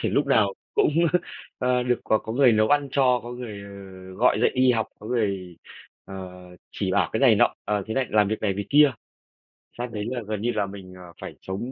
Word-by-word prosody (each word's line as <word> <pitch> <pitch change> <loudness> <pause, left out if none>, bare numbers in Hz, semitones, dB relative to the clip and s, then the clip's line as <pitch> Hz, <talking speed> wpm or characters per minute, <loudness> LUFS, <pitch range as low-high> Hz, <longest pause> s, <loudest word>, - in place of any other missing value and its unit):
thể - - -1
lúc 140 0 +1
nào 105 -7 +3 0.2
cũng, - - +3 0.7
à, 125 -1 +1
được 125 -1 0
có 110 - +2
có 110 - -7
người 130 -1 +5
nấu 110 0 +3
ăn 145 -1 +2
cho, 125 -3 +3
có 120 - -8
người, 115 -5 -7
ờ, 100 - -11 0.4
gọi 120 +6 +3
dậy - - +3
đi 130 -1 +4
học, 110 -2 0
có 105 - -11
người, 100 -7 -2 0.5
ờ, 95 - -10 0.6
chỉ - - -3
bảo - - +2
cái - - -1
này - - +6
nọ, - - +3
ờ, 105 -1 -1
thế 110 - -4
này 135 -1 0
làm 105 -2 +3
việc 110 - -3
này, 105 -2 0
việc 100 +1 -4
kia. 145 -1 +6 0.9
Sang 120 0 -4
đấy 105 -1 -4
là 125 -1 -3
gần 105 -2 -3
như 120 +2 0
là 105 -3 -1
mình, 95 -2 -10
ờ, 90 -2 -13
phải - - -8
sống, 100 +7 -5
110 Hz, 230 wpm, -24 LUFS, 100-125 Hz, 0.9 s, này